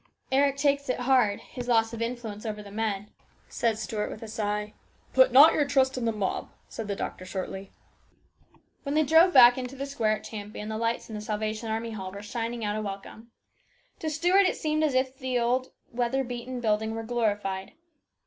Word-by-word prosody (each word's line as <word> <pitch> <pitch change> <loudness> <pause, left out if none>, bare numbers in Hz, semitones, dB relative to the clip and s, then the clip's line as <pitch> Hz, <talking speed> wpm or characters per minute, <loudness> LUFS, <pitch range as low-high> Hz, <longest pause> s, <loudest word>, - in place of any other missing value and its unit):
" - - -53
Eric 275 +1 +3
takes 280 -1 +1
it 255 - -1
hard 250 -5 +3
his 245 -1 -8
loss 225 -1 +2
of 230 - -5
influence 230 -3 -4
over 210 -2 -5
the 200 - -11
men," 210 -1 -2 0.4
said 230 -2 0
Stuart 215 -1 -3
with 215 - -8
a - - -7
sigh. 210 -1 -3 0.2
" - - -34
Put 260 -1 +6
not 280 +6 +9
your 300 - +3
trust 265 -1 +2
in 250 -2 -2
the 225 - +2
mob," 210 -3 -2 0.2
replied 225 - -5
the 200 - -2
doctor 185 - -5
shortly. 190 +1 -6 1.1
When 280 0 -3
they 310 - +4
drove 320 +5 +6
back 245 -3 +8
into 255 +1 -6
the 275 +1 -4
square 225 -6 0
at - - -16
Champion 210 0 -7
the 220 - -3
lights 230 0 -1
in 220 - -9
the 210 - -5
Salvation 215 +1 -3
Army 225 +1 -2
Hall 190 -4 -6
were 200 +1 -9
shining 230 +1 -3
out 205 0 -1
a 215 - -2
welcome. 205 +3 -7 0.7
To 315 - -2
Stuart 355 +6 +3
it - - -1
seemed 310 -1 0
as 300 -3 +2
though 255 0 +4
the 260 -1 -4
old 250 +2 0 0.2
weather 245 +2 0
beaten 245 0 -5
building 220 0 0
were 225 - -4
glorified. 205 -5 -2
230 Hz, 205 wpm, -27 LUFS, 210-260 Hz, 1.1 s, not